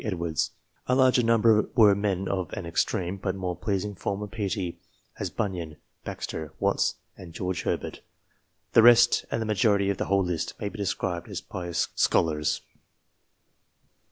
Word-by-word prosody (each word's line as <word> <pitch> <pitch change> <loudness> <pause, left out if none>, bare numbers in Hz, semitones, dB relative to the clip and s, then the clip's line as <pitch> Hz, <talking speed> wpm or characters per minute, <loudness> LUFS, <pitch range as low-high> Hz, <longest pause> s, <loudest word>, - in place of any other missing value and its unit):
Edwards; 85 -7 -1 0.4
a 125 - +3
larger 130 -1 +5
number 115 -2 +4
were 105 -5 +7
men 100 -2 -1
of 95 -3 -2
an 95 - -5
extreme, 90 +2 -1
but 95 0 -2
more 90 -2 -3
pleasing 100 +3 -2
form 100 +1 -3
of 105 - -8
piety, 100 -5 -3 0.4
as - - -2
Bunyan, 85 -7 -4 0.3
Baxter, 80 -1 -5
Watts, - - +1 0.2
and 85 -3 -11
George 90 0 -3
Herbert. - - -3 0.7
The - - +7
rest, 120 0 +6
and - - -1
the 110 - -2
majority 100 -2 +2
of 100 - -4
the - - 0
whole 100 0 +2
list, 90 -3 -3
may 105 - -2
be 110 - -10
described 95 -3 -2
as - - -4
pious 85 -2 -3
scholars. 75 -2 +1
95 Hz, 155 wpm, -27 LUFS, 90-105 Hz, 0.7 s, were